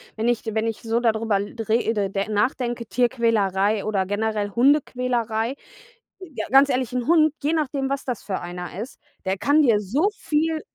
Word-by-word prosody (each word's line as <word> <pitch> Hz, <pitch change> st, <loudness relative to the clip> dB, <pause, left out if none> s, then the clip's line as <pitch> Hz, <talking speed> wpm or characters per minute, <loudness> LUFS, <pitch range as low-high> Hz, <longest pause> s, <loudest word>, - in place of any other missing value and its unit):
Wenn 225 Hz, +2 st, -1 dB
ich 240 Hz, -2 st, +1 dB
wenn 220 Hz, 0 st, -1 dB
ich 225 Hz, -, -4 dB
so 230 Hz, +1 st, 0 dB
da 235 Hz, -2 st, +3 dB
drüber 220 Hz, -2 st, 0 dB
l 200 Hz, +1 st, -5 dB
rede 220 Hz, -3 st, +1 dB
de 195 Hz, +1 st, -2 dB
nachdenke, 235 Hz, +2 st, -1 dB
Tierquälerei 220 Hz, -5 st, +1 dB
oder 200 Hz, -3 st, 0 dB
generell 205 Hz, +1 st, -1 dB
Hundequälerei. 245 Hz, -2 st, +1 dB, 0.6 s
J 375 Hz, -3 st, -10 dB
Ja, -, -, -3 dB
ganz 275 Hz, +2 st, +6 dB
ehrlich, 255 Hz, -3 st, -1 dB
'n 250 Hz, 0 st, -2 dB
Hund, 310 Hz, -2 st, +4 dB
je 300 Hz, +3 st, 0 dB
nachdem, 280 Hz, -3 st, -1 dB
was 275 Hz, 0 st, -2 dB
das 245 Hz, -5 st, -4 dB
für 195 Hz, -2 st, -3 dB
einer 175 Hz, 0 st, -7 dB
ist, 250 Hz, -, -8 dB, 0.3 s
der 190 Hz, +1 st, 0 dB
kann 290 Hz, +9 st, +3 dB
dir 230 Hz, -7 st, +4 dB
so 270 Hz, -, +1 dB
viel 315 Hz, +1 st, 0 dB
230 Hz, 185 wpm, -23 LUFS, 210-270 Hz, 0.6 s, ganz